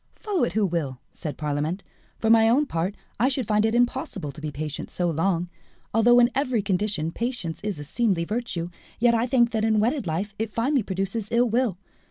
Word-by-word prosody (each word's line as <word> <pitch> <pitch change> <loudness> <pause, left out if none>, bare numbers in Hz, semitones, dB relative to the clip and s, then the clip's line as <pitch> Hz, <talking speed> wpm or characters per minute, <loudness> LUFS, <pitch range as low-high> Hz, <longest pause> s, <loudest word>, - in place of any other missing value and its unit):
"Follow 410 -5 -1
it 170 - -4
who 215 0 +2
will," 155 -8 -2
said 150 - -6
Parlamente; 150 +5 -2 0.3
"for 225 - +2
my 225 0 +6
own 275 +6 +4
part, 180 - -2 0.2
I 250 +4 +4
should 260 -3 -1
find 210 0 +2
it 225 - 0
impossible 240 - 0
to 145 - -12
be 155 - -3
patient 150 0 -5
so 175 -2 0
long. 170 +2 0 0.5
Although 235 +2 +5
in 240 0 +5
every 255 -6 0
condition 190 -4 0
patience 230 -7 -3
is 205 -5 -2
a 145 - -6
seemly 185 - 0
virtue, 210 -5 -3 0.3
yet 235 +1 +4
I 230 +1 +2
think 240 -2 +3
that 220 -2 0
in 220 -1 +3
wedded 240 - 0
life 185 +6 -2
it 220 -1 -2
finally 265 +4 +2
produces 195 +2 -3
ill 240 +1 +3
will. 230 -4 +1
210 Hz, 205 wpm, -25 LUFS, 170-240 Hz, 0.5 s, my